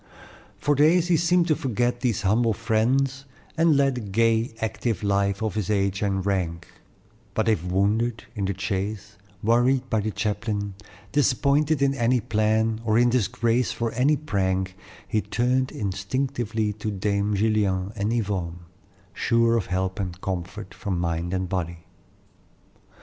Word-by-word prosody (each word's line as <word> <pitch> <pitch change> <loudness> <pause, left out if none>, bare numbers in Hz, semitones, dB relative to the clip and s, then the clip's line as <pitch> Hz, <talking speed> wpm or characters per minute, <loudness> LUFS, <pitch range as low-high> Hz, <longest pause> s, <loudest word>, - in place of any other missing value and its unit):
For 145 - +1
days 160 +5 +4
he 175 - +5
seemed 170 +1 +3
to 155 - +4
forget 120 -1 -1
these 120 -5 0
humble 110 +3 +3
friends, 130 +5 0 0.3
and 165 -2 +4
led 140 -1 +3
the 125 - -4
gay, 115 +3 +1
active 110 -2 -2
life 100 0 +1
of 110 -4 -1
his 105 -2 -2
age 100 -2 0
and 95 -2 0
rank; 85 -4 -1 0.7
but 110 - +1
if 110 -7 +2
wounded 105 +6 0
in 100 -4 -2
the 95 0 -2
chase, 100 +2 -3 0.3
worried 125 +4 +3
by 110 - +2
the 105 +1 -1
chaplain, 105 -1 -2 0.4
disappointed 145 +1 +2
in 135 0 +3
any 125 -1 +2
plan, 110 0 +1
or 110 -1 +2
in 120 0 +4
disgrace 120 +1 +1
for 115 -1 -2
any 140 +5 +2
prank, 95 -9 -1 0.3
he 110 - 0
turned 125 +3 0
instinctively 110 +2 -2
to 110 +1 -4
Dame 100 +1 0
Gillian 100 -2 +1
and 105 +1 -1
Yvonne, 95 -7 -2 0.5
sure 115 0 +2
of 110 -5 0
help 95 +2 -2
and 90 -2 -4
comfort 95 +3 -5
for 105 - -7
mind 85 -1 -1
and 95 0 -1
body. 85 -2 -4
110 Hz, 150 wpm, -25 LUFS, 100-120 Hz, 0.7 s, he